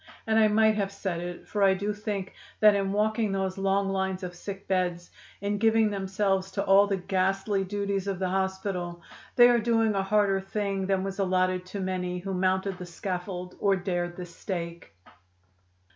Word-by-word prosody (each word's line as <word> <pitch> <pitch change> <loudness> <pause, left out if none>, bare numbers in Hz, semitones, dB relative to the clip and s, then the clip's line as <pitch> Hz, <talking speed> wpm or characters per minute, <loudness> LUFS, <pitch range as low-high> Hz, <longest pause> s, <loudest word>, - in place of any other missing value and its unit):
And 225 0 +3
I 215 - +6
might 220 +1 +4
have 200 -1 -1
said 190 -3 -3
it, 175 0 -7
for 205 - -2
I 195 -1 +5
do 205 +2 -2
think 205 -2 -4 0.3
that 210 -1 +7
in 195 -1 0
walking 215 +1 +1
those 190 -1 -2
long 195 0 +1
lines 190 0 -1
of 180 -1 -5
sick 195 +2 -8
beds, 180 -2 -1 0.3
in 205 0 -1
giving 225 -1 +3
themselves 195 -1 0
to 200 -1 -1
all 200 +1 +6
the 200 -1 0
ghastly 195 +2 0
duties 200 0 -2
of 195 -2 -1
the 185 0 -1
hospital, 190 -2 -2 0.3
they 240 -1 +8
are 240 -1 +4
doing 225 -1 +2
a 195 - +1
harder 195 0 +2
thing 195 -1 -2
than 190 -1 +1
was 195 0 -5
allotted 185 -1 +1
to 200 +2 -6
many 180 -1 -2
who 190 +2 -4
mounted 190 +1 0
the 180 - -6
scaffold 180 0 -5
or 200 -1 +3
dared 175 -2 -2
the 180 - -6
stake." 170 -1 -6
195 Hz, 185 wpm, -27 LUFS, 185-205 Hz, 0.3 s, they